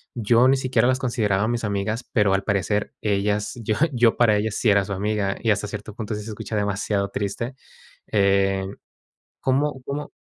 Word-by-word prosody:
yo 120 +2 +4
ni 135 +1 +4
siquiera 130 -1 +2
las 130 - +2
consideraba 110 -7 0
a - - +1
mis 120 -1 -1
amigas, 105 +3 -2
pero, 105 -4 +3
al 95 0 +1
parecer 105 +1 -1
ellas 105 0 0
yo 110 0 0 0.2
yo 120 -2 +3
para 115 -3 +4
ellas 110 0 -1
sí 115 - +2
era 100 -1 +4
su 100 - -8
amiga 100 0 -1
y 115 - +2
hasta 105 +1 0
cierto 105 +1 -7
punto, 110 -1 -4
sí 105 - -5
se 110 - -8
escucha 110 +1 -6
demasiado 100 0 -1
triste. 100 +6 -3 0.6
Eh, 95 -1 +2 0.7
¿cómo 135 +1 0
cómo? 145 +1 -4
105 Hz, 185 wpm, -23 LUFS, 100-120 Hz, 0.7 s, yo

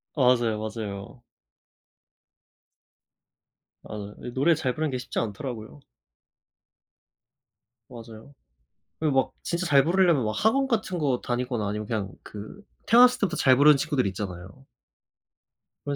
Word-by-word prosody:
맞아요, 125 -5 +2
맞아요. 110 +1 -7 2.6
맞아요. 105 -1 -8
이 125 - -6
노래 140 +7 +3
잘 130 -5 -2
부르는 155 -1 -2
게 130 - -2
쉽지 125 - -4
않더라고요. 115 +3 -6 2.1
맞아요. 115 +1 -12 0.7
그리고 155 -3 0
막 - - -8
진짜 175 +2 -2
잘 140 -5 +5
부르려면 170 -5 +3
막 110 - 0
학원 240 +7 +2
같은 220 -7 -1
거 135 -5 0
다니거나 120 -3 -2
아니면 105 0 -4
그냥 105 -4 -3
그 110 - -10 0.3
태어났을 250 +2 +6
때부터 180 -5 -1
잘 130 -1 +5
부르는 145 +2 +6
친구들 140 -4 0
있잖아요. 95 +5 -7 1.2
그런 145 -1 -2
130 Hz, 280 characters per minute, -26 LUFS, 110-155 Hz, 2.6 s, 태어났을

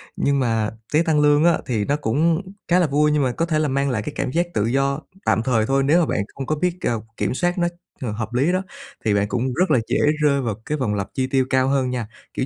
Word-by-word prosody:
Nhưng 140 -1 +1
mà 115 -4 +1 0.2
tái 160 +3 +4
tăng 155 -2 +2
lương 150 +1 +4
á 170 - +4
thì 110 -5 -1
nó 145 - +1
cũng 155 - +1 0.3
khá 180 +1 +4
là 170 - +3
vui, 150 +2 +2
nhưng 150 -2 +2
mà 125 - +1
có 165 - -1
thể 155 -2 0
là 155 - +1
mang 140 +1 0
lại 110 -5 -1
cái - - -6
cảm 125 - -2
giác 170 +3 +1
tự 105 - +1
do 135 +4 0 0.2
tạm 110 - +2
thời 115 -4 +2
thôi, 135 +1 +1
nếu 155 +6 +4
mà 170 - +3
bạn - - -1 0.2
không 135 - -5
có 155 - 0
biết, 180 +3 -1
ờ, 115 -2 -1 0.2
kiểm - - -1
soát 175 +6 0
nó 175 0 +2 0.3
h - - -3
hợp 110 +2 -4
lý 140 +8 +2
đó, 185 +1 +1 0.4
thì 105 - +3
bạn 100 0 +1
cũng 125 +3 -1
rất 180 +1 +1
là 130 - +5
dễ 130 +4 +1 0.2
rơi 140 -2 +3
vào 115 -5 -2
cái 150 - -2
vòng 110 -6 -1
lặp 100 -1 -2
chi 130 -1 -1
tiêu 130 -1 +1
cao 130 0 +2
hơn 135 -2 +1
nha. 120 -4 -3 0.3
Kiểu 130 - -1
135 Hz, 280 wpm, -22 LUFS, 120-155 Hz, 0.4 s, là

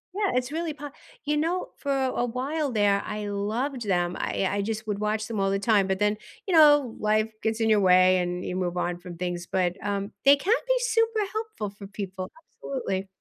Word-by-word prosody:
Yeah, 405 -2 +1
it's 250 +2 0
really 325 -1 -2
po 290 0 -8 0.4
You 295 0 +1
know, 340 +4 -1
for 280 - -3
a 260 -2 0
while 270 +4 -2
there, 205 -2 +3
I 210 -1 -4
loved 220 +5 -2
them, 175 -1 0
I 195 - 0
I 200 0 -1
just 220 +1 -4
would 205 -1 -2
watch 215 0 -1
them 220 -3 -3
all 195 0 +2
the 195 - +1
time, 200 -3 +3
but 190 0 -1
then, 210 0 +2 0.3
you 370 - 0
know, 290 -6 +6
life 215 +1 +1
gets 225 0 0
in 220 - +2
your 215 -1 +5
way, 185 0 +6
and 180 0 -2
you 180 - -3
move 180 -1 -1
on 175 0 -1
from 175 -1 -9
things, 175 -1 -3
but, 180 -1 0
um, 200 0 -2
they 280 +1 +9
can 395 +11 +2
be - - +3
super 455 -2 +1
helpful 435 - -4
for 200 0 -11
people, 190 -2 -6 0.3
absolutely. 195 -8 -3
215 Hz, 215 wpm, -26 LUFS, 195-280 Hz, 0.4 s, they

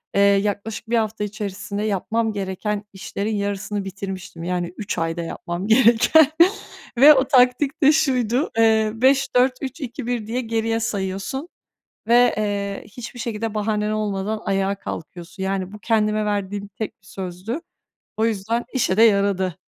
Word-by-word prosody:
eee, 200 - +4
yaklaşık 205 +2 +1
1 235 - +2
hafta 220 -1 -1
içerisinde 205 -1 -4
yapmam 220 +2 0
gereken 200 +1 -3
işlerin 205 +2 -4
yarısını 200 0 -3
bitirmiştim. 190 -3 -7
Yani 180 0 -2
3 210 - -4
ayda 165 +1 -1
yapmam 175 +3 -5
gereken. 240 +6 +6 0.7
Ve 290 +4 +9
o 265 -2 +3
taktik 265 +4 +3
de 290 - +7
şuydu, 260 -4 +1
eee, 220 -1 +4
5-4-3-2-1 255 -1 0
diye 245 +3 -1
geriye 225 -1 -1
sayıyorsun 205 - -3 0.6
ve, 240 +1 +5
eee, 200 -1 -2
hiçbir 245 +3 -9
şekilde 225 -1 -3
bahanen 210 0 -1
olmadan 210 0 -2
ayağa 195 0 0
kalkıyorsun. 180 +1 -7
Yani, 190 -1 -2
bu 210 - -10
kendime 215 0 +1
verdiğim 205 -1 -2
tek 205 0 -7
bir 190 - -21
sözdü. 190 - -5 0.6
O 220 - +1
yüzden 225 +2 -1
işe 230 -7 +1
de 225 - +5
yaradı. 200 -5 +3
210 Hz, 135 wpm, -22 LUFS, 195-235 Hz, 0.7 s, Ve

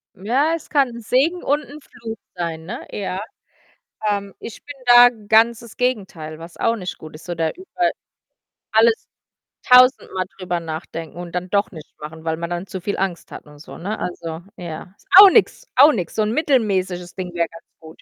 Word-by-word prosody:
Ja, 260 - +1
es 325 - -10
kann 275 -4 +3
'n 235 0 -9
Segen 280 +10 +1
und 290 +2 +1
'n 290 +2 -11
Fluch 225 -4 -9 0.2
sein, 165 -2 -4
ne, 220 +8 -7
ja. 190 -2 -4 0.9
Ähm, 200 -1 -2
ich 230 - -9
bin 290 - -9
da 245 0 +9
ganz 225 +1 +2
das 235 -2 -14
Gegenteil, 190 -11 -3
was 165 +1 -11
auch 230 - +1
nicht 185 -5 -6
gut 155 0 -11
ist. 155 - -13
So 175 -1 -4
da 165 -1 0
über 360 -1 -2 0.8
alles 225 +1 +3 0.6
tausendmal 250 -7 +5
drüber 180 -2 -2
nachdenken 160 0 -7
und 175 -1 -7
dann 180 +1 -3
doch 200 0 +1
nicht 160 -5 -12
machen, 160 +1 -9
weil 160 0 0
man 170 +1 -4
dann 175 +2 -4
zu 190 0 -6
viel 200 +3 -3
Angst 185 -3 -3
hat - - -9
und 150 -1 -16
so, 150 - -11
ne? 210 +5 -4
Also, 165 -2 -5 0.2
ja, 175 +1 -8
ist - - -28
auch 400 0 +12
nix, 450 +4 +2
auch 290 +4 +8
nix. 180 -7 -4
So - - +1
'n 210 - -1
mittelmäßiges 195 - 0
Ding 180 -2 -6
wäre 170 -1 0
ganz 165 - -14 0.2
gut. 160 0 -14
195 Hz, 195 wpm, -21 LUFS, 170-240 Hz, 0.9 s, auch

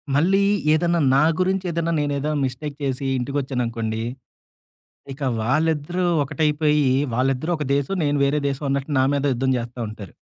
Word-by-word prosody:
మళ్ళీ 185 +7 +3 0.3
ఏదన్నా 170 +1 +2 0.2
నా 140 - +5 0.2
గురించేదన్నా, 180 -3 0
నేనేదన్నా 145 +1 -1
మిస్టేక్ 140 +3 -5
చేసి, 135 0 -2
ఇంటికొచ్చానునుకోండి, 120 -4 -2 1.1
ఇక 140 - -15 0.2
వాళ్ళిద్దరూ 155 +7 0 0.2
ఒకటైపోయి, 150 0 +1 0.3
వాళ్ళిద్దరూ 135 +5 0
ఒక 150 - -3
దేశం, 140 +8 -1
నేను 145 0 +1
వేరే 145 +2 +1
దేశం 140 +2 -4
అన్నట్టు 140 +2 -1
నా - - +4
మీదె 140 -1 +1
యుద్ధం 130 +2 0
జేస్తా 120 +1 -6
ఉంటారు. 105 -3 -10
145 Hz, 135 wpm, -22 LUFS, 130-155 Hz, 1.1 s, నా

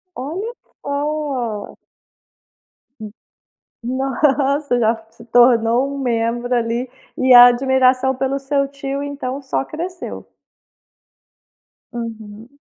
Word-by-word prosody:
Olha 350 - -5 0.3
só! 280 -7 -3 1.2
Hum, 215 -1 -7 0.7
nossa! 270 +2 0
Já 225 0 +2
se 230 - -16
tornou 240 +2 +3
um - - -5
membro 240 -1 -1
ali, 235 +1 -1 0.3
e 260 0 +4
a 245 0 +11
admiração 260 +1 +3
pelo 265 +1 -1
seu 275 0 0
tio, 275 0 -5
então, 285 -1 -5
só 265 0 -2
cresceu. 350 +5 -7 1.7
Uhum. 230 +2 -8
260 Hz, 95 wpm, -19 LUFS, 240-280 Hz, 1.7 s, a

